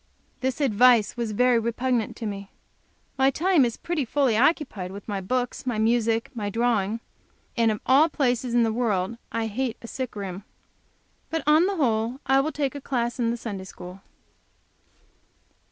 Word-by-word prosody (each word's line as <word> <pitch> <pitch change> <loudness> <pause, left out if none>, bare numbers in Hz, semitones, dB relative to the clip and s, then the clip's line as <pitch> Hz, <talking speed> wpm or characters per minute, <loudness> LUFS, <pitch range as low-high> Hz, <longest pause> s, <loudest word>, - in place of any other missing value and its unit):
This 260 +1 -2
advice 245 -3 +4
was 235 -3 -2
very 245 +2 +3
repugnant 235 0 -1
to 230 - -6
me. 200 -1 -5 0.7
My 265 0 +5
time 335 +2 +3
is 235 -2 -1
pretty 335 -4 -2
fully 260 -1 +1
occupied 230 - +1
with 200 +1 -10
my 200 -3 -3
books, 250 +6 -2
my 240 -3 0
music 225 0 +2
and - - -33
my 205 -2 -2
drawing. 225 -1 0 0.5
And 230 -2 +3
of 215 -1 -1
all 285 +5 +5
places 250 -4 0
in 240 - +5
the 225 -1 +1
world 220 -2 -1
I 230 -1 -1
hate 235 +2 -2
a 235 - -10
sick 255 -1 -5
room. 195 -1 -6 0.9
But, 325 -2 -2
on 310 +4 +5
the 400 - -1
whole, 235 -4 0
I 270 +1 +4
will 300 +3 0
take 280 -4 -2
a 285 - -7
class 240 -2 -2
in 235 -1 +1
the 235 - -1
Sunday 200 -5 -6
school. 180 0 -10
235 Hz, 175 wpm, -25 LUFS, 220-265 Hz, 0.9 s, My